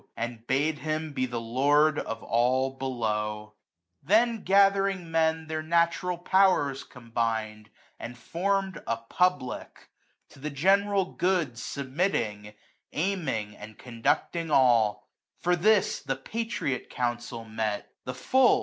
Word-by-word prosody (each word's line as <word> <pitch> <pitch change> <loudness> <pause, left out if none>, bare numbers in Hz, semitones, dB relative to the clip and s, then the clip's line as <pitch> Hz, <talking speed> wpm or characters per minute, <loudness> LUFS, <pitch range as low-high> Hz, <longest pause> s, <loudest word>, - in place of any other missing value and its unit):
And 115 0 -5
bade 145 +3 +1
him 155 0 -3
be 130 -2 -1
the 120 -1 -3
Lord 145 +6 +3
of 115 - -5
all 130 +3 +2
below* 105 -5 -3 0.5
95 - - -28
Then 225 +3 +3
gathering 195 -2 +3
men 160 0 +1
their 155 0 -3
natural 170 +2 +1
powers 175 -7 +2
combined,. 115 -3 -3 0.3
And 120 +1 -7
form'd 195 +6 -1
a 115 - 0
Public; 130 +3 -2 0.4
to - - -17
the 150 +3 -4
general 195 +6 +2
good 180 -8 +1
i^ilmiitting, 120 - -2 0.4
aiming, 150 - -2
and 110 0 -11
conducting 145 +7 -1
alL 120 -7 +3 0.3
For 180 0 +1
this 210 +4 +3
the 135 - -2
Patriot 140 - -3
Council 120 -1 -3
met, 110 -2 -3
the 125 - -5
full. 255 - +4
140 Hz, 120 wpm, -27 LUFS, 115-180 Hz, 0.5 s, full